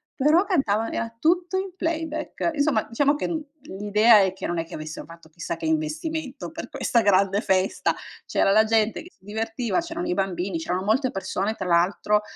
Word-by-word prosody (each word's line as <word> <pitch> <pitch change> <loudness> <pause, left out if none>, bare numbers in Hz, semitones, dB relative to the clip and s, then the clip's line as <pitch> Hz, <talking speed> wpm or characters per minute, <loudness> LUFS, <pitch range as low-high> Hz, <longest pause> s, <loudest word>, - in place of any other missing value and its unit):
però 300 +6 +4
cantavano 225 - +1
era 230 0 -3
tutto 350 +4 +1
in 380 -1 -4
playback. 325 -2 -2
Insomma, 285 -7 +2
diciamo 285 +5 +2
che 295 - -2
n 320 -2 -3 0.2
l'idea 210 +3 +4
è 190 -2 +3
che, 190 +1 -6
non 175 -1 -2
è 165 - -2
che 165 - -9
avessero 155 0 -7
fatto 165 0 -14
chissà 170 +1 -5
che 165 - -6
investimento, 255 - -2
per - - -7
questa 235 - +1
grande 200 0 +3
festa, 190 -1 +1 0.3
c'era - - +2
la 215 +2 +6
gente 220 0 +1
che 355 - -14
si 190 - -28
divertiva, 225 +7 -2
c'erano 335 +1 -5
i - - 0
bambini, 185 -1 -2
c'erano 180 +3 -2
molte 250 +5 +2
persone, 195 +2 -2
tra 190 - -5
l'altro, 185 +4 +2
215 Hz, 190 wpm, -24 LUFS, 190-300 Hz, 0.3 s, la